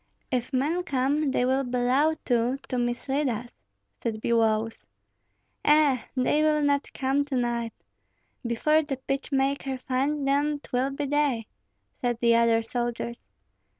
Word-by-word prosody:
"If 250 0 -1
men 290 +7 +1
come, 285 -1 0
they 255 -1 +1
will 265 +2 +2
bellow 255 +5 +2
too, 245 +1 +1
to 255 - -1
mislead 265 +4 -1
us," 240 +1 -6 0.4
said 220 -2 -2
Biloüs. 225 -1 +1 0.8
"Eh! 295 -4 +4 0.2
they 275 +4 +2
will 305 -1 +2
not 285 0 +1
come 270 +1 0
to 285 -2 -4
night. 235 -2 -1 0.7
Before 280 +7 +2
the 290 -3 -4
pitch 275 +2 -4
maker 270 0 0
finds 275 +3 -1
them 290 +2 +1
'twill 255 -1 -1
be 275 +1 -3
day," 280 -5 +1 0.6
said 240 -1 0
the 235 -1 +4
other 230 -1 +3
soldiers. 235 0 -3
260 Hz, 140 wpm, -26 LUFS, 240-285 Hz, 0.8 s, Eh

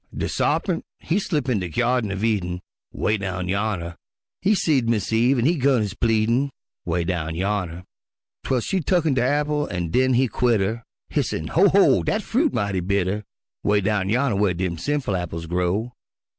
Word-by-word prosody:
De - - -1
Sarpint - - 0
he 170 +5 -1
slip 150 -9 -1
in 120 -5 +1
de 90 -2 -4
Gyardin 120 +5 +1
uv 100 +1 -3
Eden, 90 -6 0 0.3
('Way 105 - 0
down 90 -2 -3
yonner) 95 -4 -2 0.4
He 210 +2 +3
seed 135 -10 +1
Mis' 110 -2 0
Eve 120 +4 +3
an' 120 - +1
he 170 +3 +3
'gun 135 -3 +3
his 100 -2 -3
pleadin', 115 +5 +1 0.4
('Way 85 0 0
down 80 -2 -2
yonner) 90 -2 -2 0.6
'Twel 130 -2 0
she 190 - -1
tucken 165 -2 +1
de 130 - +1
apple 150 +2 0
an' 85 -3 -3
den 130 +3 +3
he 130 +2 +3
quit 120 -1 +1
'er, 110 +4 -2 0.3
Hissin', 80 0 -2
"Ho! 190 +5 +5
ho! 200 0 +5
dat 215 0 -1
fruit 285 +6 +1
mighty 100 -2 -1
bitter." 100 +2 -1 0.4
'Way 105 0 +2
down 100 -1 0
yonner 120 -1 +1
whar 100 -3 +2
dem 85 -2 -2
sinful 145 - -1
apples 85 -2 -4
grow. 90 +7 -1
110 Hz, 180 wpm, -23 LUFS, 90-130 Hz, 0.6 s, Ho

